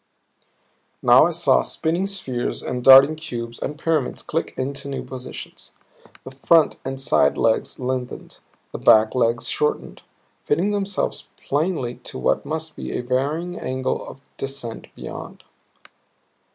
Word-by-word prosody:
Now - - +7
I - - -1
saw - - +3
spinning 170 +4 -1
spheres 135 -12 -3
and 125 -1 -4
darting 135 +4 +9
cubes 120 -7 -6
and 150 - -4
pyramids 155 -4 -1
click - - -3
into 140 +1 -4
new 140 - -4
positions. 130 -1 -9 0.5
The 130 - -9
front 155 +4 +3
and 135 0 -5
side 135 -2 +2
legs 110 - +1
lengthened, 125 -1 -4 0.3
the - - -6
back 110 0 +5
legs 115 -2 +1
shortened, 150 - -2 0.4
fitting 175 +8 +1
themselves 200 -1 -2
plainly 145 -5 -2
to - - -6
what 65 - 0
must 160 0 -4
be - - -5
a - - -2
varying 145 +8 -2
angle 130 0 -2
of 135 - -11 0.2
descent 135 -4 -6
beyond. - - -9
135 Hz, 135 wpm, -22 LUFS, 125-160 Hz, 0.5 s, darting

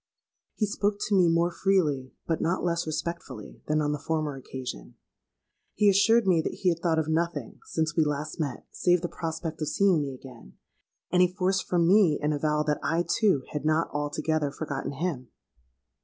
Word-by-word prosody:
He 215 - +1
spoke 205 0 -1
to 205 - +1
me 180 -2 +5
more 170 +1 +2
freely, 155 -10 +1
but 165 - -1
not 170 +3 0
less 170 -1 0
respectfully, 155 -8 -5
than 155 0 +1
on 145 - 0
the 150 - -2
former 155 -1 -2
occasion. 130 - -7 0.8
He 205 -1 +5
assured 220 +4 +4
me 175 -4 +4
that - - -4
he 185 - +1
had 170 -1 0
thought 165 -1 +1
of 160 -1 0
nothing, 160 -4 -2
since 160 -1 -1
we 165 - +4
last 150 +1 -3
met, 145 -5 -3
save 175 -1 +2
the 175 - -2
prospect 160 -1 -5
of 155 - -1
seeing 190 -3 +3
me 135 -2 -4
again; 125 - -14 0.5
and 180 +1 +4
he 180 - +6
forced 185 +1 0
from 170 -2 +2
me 185 -5 +5
an 150 +1 0
avowal 150 +1 0
that 150 -1 0
I 170 +1 0
too 195 - +2
had 150 - -3
not 155 +2 +1
altogether 145 +1 -1
forgotten 140 -1 -4
him! 140 -4 -3
160 Hz, 185 wpm, -27 LUFS, 150-180 Hz, 0.8 s, he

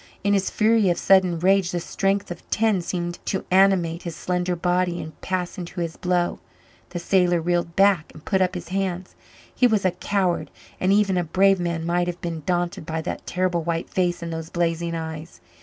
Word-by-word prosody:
In 205 0 +2
his 195 -1 +1
fury 220 -2 +3
of 175 - +1
sudden 185 -3 +4
rage 190 +1 +3
the 175 - -2
strength 195 +3 -1
of 175 - -9
ten 215 -4 +2
seemed 175 0 -3
to 190 - -2
animate 185 -3 +3
his 170 -2 -6
slender 180 +1 -1
body 175 0 0
and 155 -1 -9
pass 185 +1 -3
into 175 0 -6
his 165 -1 -3
blow. 180 -1 0 0.5
The 180 - -5
sailor 175 0 +2
reeled 170 0 -1
back 195 -5 +3
and 155 - -15
put 190 -2 +1
up 185 0 +1
his 180 - -6
hands. 185 -1 -2 0.4
He 250 - +4
was 215 -4 +1
a 185 - +4
coward 180 0 -1 0.3
and 185 - +2
even 200 -2 +3
a - - 0
brave 190 +3 +3
man 170 -2 -2
might 175 +1 +1
have 175 0 -4
been 170 -3 -4
daunted 175 -2 -1
by 160 +1 -4
that - - -5
terrible 180 -2 0
white 165 0 -3
face 175 -2 0
and 165 0 -4
those 160 0 -5
blazing 170 -1 -1
eyes. 160 0 -6
175 Hz, 200 wpm, -23 LUFS, 170-190 Hz, 0.5 s, sudden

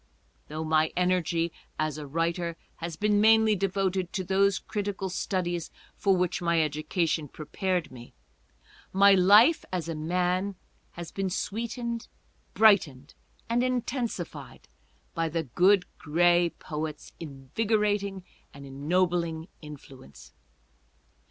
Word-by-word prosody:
Though 155 +1 -5
my 155 0 +2
energy, 175 -2 +1 0.3
as 155 -1 -2
a 150 - -7
writer, 170 +2 -2 0.2
has 165 -1 -5
been 210 +2 +2
mainly 220 0 +5
devoted 190 -1 -1
to 190 - -2
those 195 +1 +2
critical 200 -2 -4
studies 175 -3 -2 0.3
for 195 -2 +2
which 180 +1 -1
my 170 -1 +2
education 155 +1 -1
prepared 170 +4 -3
me, 120 -2 -13 0.8
my 200 +1 +6
life, 205 - +6
as 180 -3 -3
a 165 - -3
man, 180 +5 -1 0.4
has 170 -1 -8
been 195 -1 -2
sweetened, 235 +4 -4 0.5
brightened 160 -11 +3 0.3
and 235 +1 +1
intensified 250 -1 -3 0.5
by 165 -1 -1
the 165 +1 -2
Good 180 - +3
Gray 175 +2 +3
Poet's 155 0 -6
invigorating 200 - -1 0.3
and 140 0 -10
ennobling 165 +4 -1
influence. 130 - -13
175 Hz, 115 wpm, -27 LUFS, 160-200 Hz, 0.8 s, my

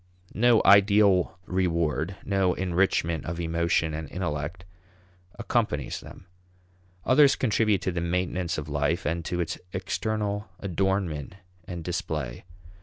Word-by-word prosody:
No 120 +1 +4
ideal 100 -2 +5
reward, 85 -1 0
no 95 -2 +1
enrichment 85 -4 0
of 85 +1 -4
emotion 85 -1 0
and 75 -1 -5
intellect, 85 0 -4 0.7
accompanies - - -1
them. - - -13 0.8
Others 135 +2 +6
contribute 110 -4 +1
to 95 - 0
the 85 -1 -2
maintenance 90 0 -1
of 75 -1 -5
life, 75 +5 -1
and 85 +2 -1
to 90 - -2
its 85 +1 -2
external 105 +2 -2
adornment 95 -4 -1 0.3
and 85 -2 -6
display. 75 -6 -4
90 Hz, 115 wpm, -26 LUFS, 80-100 Hz, 0.8 s, Others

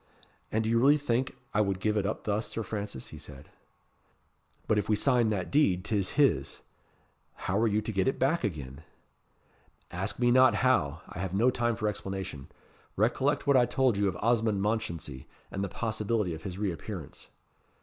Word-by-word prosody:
"And 110 +1 +1
do 110 - -1
you 115 - +3
really 140 +4 +5
think 130 -3 -1 0.2
I 105 - +3
would 100 -2 0
give 105 +1 0
it 100 -2 +1
up 110 - -3
thus, 105 +1 -1
Sir 115 - -4
Francis?" 100 -11 -5
he - - -10
said. 70 0 -12 1.2
"But 105 - +2
if 105 - -4
we 110 - +4
sign 120 0 +3
that 95 -4 -2
deed 100 -11 +3
'tis 105 -3 0
his. 80 - +2 0.8
How 95 +2 +1
are 115 - +3
you 105 0 +1
to - - -3
get 95 +1 0
it 135 - +1
back 155 +6 +1
again?" 70 -5 -4 1.1
"Ask 95 +4 -3
me 120 0 +3
not 130 +1 +6
how 80 - +2
I - - -9
have 95 0 -3
no 120 +6 +4
time 120 -2 0
for 110 -1 -2
explanation. 95 -8 -5 0.5
Recollect - - +1
what 140 - +4
I 120 -1 +4
told 130 -4 +2
you 100 0 +1
of 90 -2 -2
Osmond 110 -3 +2
Mounchensey, 95 - -3 0.2
and 100 - -3
the 100 - -2
possibility 110 -3 -1
of 80 - -7
his 90 +1 -6
re 100 -2 0
appearance." 85 -2 -8
105 Hz, 190 wpm, -29 LUFS, 95-115 Hz, 1.2 s, not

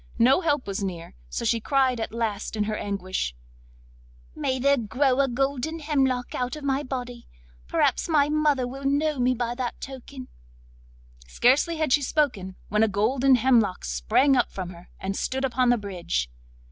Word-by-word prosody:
No 255 +8 +5
help 295 -5 0
was 200 0 -3
near, 175 -3 -5 0.2
so - - -4
she 230 - +2
cried 260 0 +1
at 225 - -3
last 225 -2 -3
in 210 - 0
her 215 +1 -2
anguish: 185 - -3 1.0
'May 260 - -1
there 280 +2 +3
grow 255 +3 +1
a 275 - +4
golden 270 +4 -1
hemlock 270 -5 0
out 250 +2 -2
of 300 - -9
my 275 0 0
body! 245 -3 -6 0.4
perhaps - - +1
my 295 -3 +4
mother 300 -3 +2
will 270 +2 -8
know 285 +1 +1
me 250 +1 +2
by 240 0 -2
that 245 -1 -4
token.' 265 -1 -9 1.0
Scarcely 275 - +2
had 310 -5 +1
she 290 - +4
spoken 250 - -1
when 210 +2 +1
a 220 - +5
golden 245 +6 +3
hemlock 235 -6 +2
sprang - - +2
up 245 - +2
from 185 -2 -6
her, 175 0 -14
and 195 +1 -3
stood 265 +4 -1
upon 250 -1 +1
the 245 - +4
bridge. 175 - -3
250 Hz, 170 wpm, -25 LUFS, 210-275 Hz, 1.0 s, No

